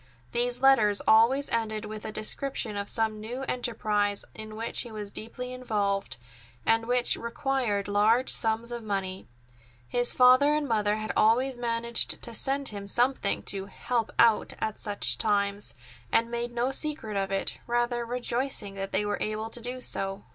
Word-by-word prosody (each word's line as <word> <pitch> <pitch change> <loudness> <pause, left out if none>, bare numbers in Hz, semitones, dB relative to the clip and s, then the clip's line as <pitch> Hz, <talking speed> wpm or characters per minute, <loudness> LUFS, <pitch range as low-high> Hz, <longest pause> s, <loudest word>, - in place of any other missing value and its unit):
These 245 +1 -1
letters 215 -7 +5
always 235 +6 +5
ended 220 -2 -1
with 215 0 -7
a 220 - -4
description 220 +1 -1
of 200 0 -3
some 220 -1 0
new 240 +5 -5
enterprise 210 -5 -1
in 215 0 -9
which 225 +1 -1
he 240 - -7
was 210 -2 -6
deeply 250 +4 -6
involved, 205 - -1 0.5
and 225 0 +2
which 245 0 +2
required 235 -4 -1
large 215 +5 +3
sums 225 +1 0
of 240 -1 -4
money. 195 -3 -4 0.6
His 245 - +5
father 255 +4 +6
and 300 -1 -1
mother 210 -3 +1
had 215 0 -3
always 250 +5 +3
managed 235 0 -1
to 235 - -6
send 275 +4 0
him 200 -1 -7
something 240 -1 +1
to 195 -1 -1
"help 230 +3 -2
out" 225 -2 +4
at 215 -1 -3
such 205 - 0
times, 200 -1 0 0.4
and 230 +1 +2
made 240 0 -3
no 240 +2 0
secret 280 -7 -2
of 195 0 -1
it, 195 - -1
rather 240 0 0
rejoicing 240 -2 -2
that 195 0 -5
they 210 +2 +1
were 205 0 -2
able 215 +1 -3
to 240 - -2
do 250 +2 -4
so. 195 -5 -3
225 Hz, 165 wpm, -28 LUFS, 205-245 Hz, 0.6 s, father